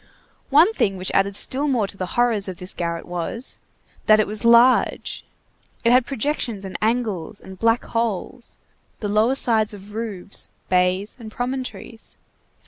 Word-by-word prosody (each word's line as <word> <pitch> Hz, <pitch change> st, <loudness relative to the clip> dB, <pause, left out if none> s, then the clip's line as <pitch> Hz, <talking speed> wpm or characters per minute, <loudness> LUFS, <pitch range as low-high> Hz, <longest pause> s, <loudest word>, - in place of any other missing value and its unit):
One 320 Hz, +10 st, +5 dB
thing 195 Hz, -, 0 dB
which 185 Hz, 0 st, -2 dB
added 195 Hz, 0 st, +2 dB
still 275 Hz, +7 st, +1 dB
more 245 Hz, -7 st, +1 dB
to 195 Hz, -, -8 dB
the 185 Hz, -2 st, -4 dB
horrors 230 Hz, -5 st, +2 dB
of 185 Hz, -2 st, -6 dB
this 180 Hz, +1 st, -5 dB
garret 170 Hz, -1 st, -3 dB
was, 175 Hz, +9 st, -4 dB, 0.5 s
that 215 Hz, 0 st, +7 dB
it 215 Hz, -, +3 dB
was 210 Hz, +2 st, -1 dB
large. 235 Hz, +2 st, +4 dB, 0.6 s
It 235 Hz, -, +4 dB
had 250 Hz, -1 st, +4 dB
projections 240 Hz, -6 st, -2 dB
and 190 Hz, -, -7 dB
angles 215 Hz, -5 st, -1 dB
and 190 Hz, -1 st, -12 dB
black 230 Hz, +1 st, +2 dB
holes, 230 Hz, +2 st, -3 dB, 0.4 s
the 210 Hz, -, -3 dB
lower 215 Hz, +5 st, +2 dB
sides 220 Hz, -5 st, +3 dB
of 205 Hz, +1 st, -13 dB
roofs, 210 Hz, -4 st, -3 dB, 0.2 s
bays, 185 Hz, +3 st, +1 dB
and 220 Hz, -2 st, -9 dB
promontories. 245 Hz, -1 st, -5 dB
215 Hz, 155 wpm, -22 LUFS, 195-240 Hz, 0.6 s, that